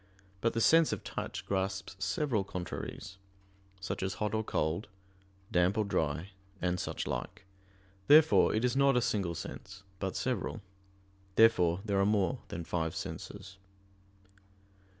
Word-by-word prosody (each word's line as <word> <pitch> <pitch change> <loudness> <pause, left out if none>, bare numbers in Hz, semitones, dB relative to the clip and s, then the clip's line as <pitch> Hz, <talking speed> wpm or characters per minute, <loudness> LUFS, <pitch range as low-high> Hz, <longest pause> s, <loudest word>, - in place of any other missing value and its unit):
But 115 - +1
the 115 - 0
sense 165 +5 +5
of - - -3
touch - - -5
grasps 95 -1 -2
several 110 +2 0
contraries; 95 0 -6 0.6
such 95 +1 -4
as 95 +1 -2
hot 105 0 -2
or 110 0 0
cold, 80 0 -1 0.6
damp 90 +4 +3
or 110 - +2
dry, 80 -1 -1 0.3
and 90 0 0
suchlike. - - -4 0.6
Therefore 155 +2 +7
it 110 +3 +1
is 125 - +1
not 140 -1 +4
a - - +6
single 95 -7 0
sense 95 +3 -8 0.2
but 95 -1 -3
several. 120 -3 -2 0.7
Therefore 90 -6 +5
there 100 -2 +1
are 100 - +4
more 100 -4 +1
than 85 - -5
five 80 -1 -2
senses. 95 -1 -7
95 Hz, 135 wpm, -32 LUFS, 90-110 Hz, 0.7 s, Therefore